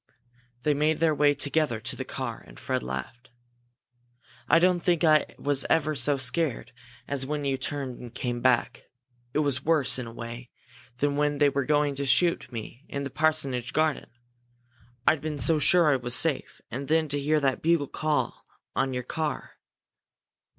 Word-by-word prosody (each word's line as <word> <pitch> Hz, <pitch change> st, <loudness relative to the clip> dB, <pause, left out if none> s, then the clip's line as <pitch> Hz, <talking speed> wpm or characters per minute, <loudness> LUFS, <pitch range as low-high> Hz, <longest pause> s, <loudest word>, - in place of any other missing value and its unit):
They 150 Hz, -, +3 dB
made 150 Hz, +2 st, +1 dB
their 160 Hz, -1 st, +3 dB
way 145 Hz, 0 st, +3 dB
together 140 Hz, -4 st, 0 dB
to -, -, -4 dB
the -, -, -4 dB
car, -, -, -6 dB
and -, -, -14 dB
Fred -, -, -2 dB
laughed. 65 Hz, -, -6 dB, 1.2 s
"I -, -, +6 dB
don't 180 Hz, +1 st, +3 dB
think 175 Hz, -2 st, +1 dB
I 155 Hz, -2 st, +3 dB
was 140 Hz, -1 st, +1 dB
ever 155 Hz, -1 st, +2 dB
so 140 Hz, +1 st, +3 dB
scared 130 Hz, -1 st, 0 dB, 0.4 s
as 135 Hz, -2 st, -1 dB
when 150 Hz, 0 st, -3 dB
you 135 Hz, -1 st, +1 dB
turned 135 Hz, -1 st, -4 dB
and 120 Hz, -2 st, -9 dB
came 120 Hz, 0 st, -3 dB
back. 125 Hz, -2 st, +1 dB, 0.5 s
It 150 Hz, 0 st, +2 dB
was 135 Hz, -2 st, 0 dB
worse, 155 Hz, -5 st, +2 dB
in 125 Hz, -, -5 dB
a -, -, -8 dB
way, 115 Hz, +1 st, -8 dB, 0.5 s
than 145 Hz, +2 st, 0 dB
when 145 Hz, 0 st, +1 dB
they 145 Hz, 0 st, +4 dB
were 140 Hz, -1 st, -1 dB
going 150 Hz, 0 st, +2 dB
to 140 Hz, -, -2 dB
shoot 170 Hz, +3 st, +2 dB
me 120 Hz, +3 st, -8 dB
in 140 Hz, -, -4 dB
the 140 Hz, -, -5 dB
parsonage 140 Hz, -6 st, 0 dB
garden. 155 Hz, -1 st, 0 dB, 1.0 s
I'd 155 Hz, -, +3 dB
been 155 Hz, 0 st, -4 dB
so 155 Hz, +4 st, +3 dB
sure 160 Hz, +1 st, +6 dB
I -, -, +2 dB
was 120 Hz, 0 st, -1 dB
safe 150 Hz, 0 st, -1 dB
and 135 Hz, +4 st, -5 dB
then 160 Hz, 0 st, +2 dB
to 145 Hz, +1 st, -1 dB
hear 150 Hz, +2 st, +2 dB
that 135 Hz, -2 st, 0 dB
bugle 165 Hz, -2 st, +2 dB
call 155 Hz, +1 st, -2 dB, 0.3 s
on 135 Hz, -1 st, 0 dB
your 125 Hz, -, -3 dB
car!" 155 Hz, +4 st, -4 dB
145 Hz, 180 wpm, -27 LUFS, 130-155 Hz, 1.2 s, I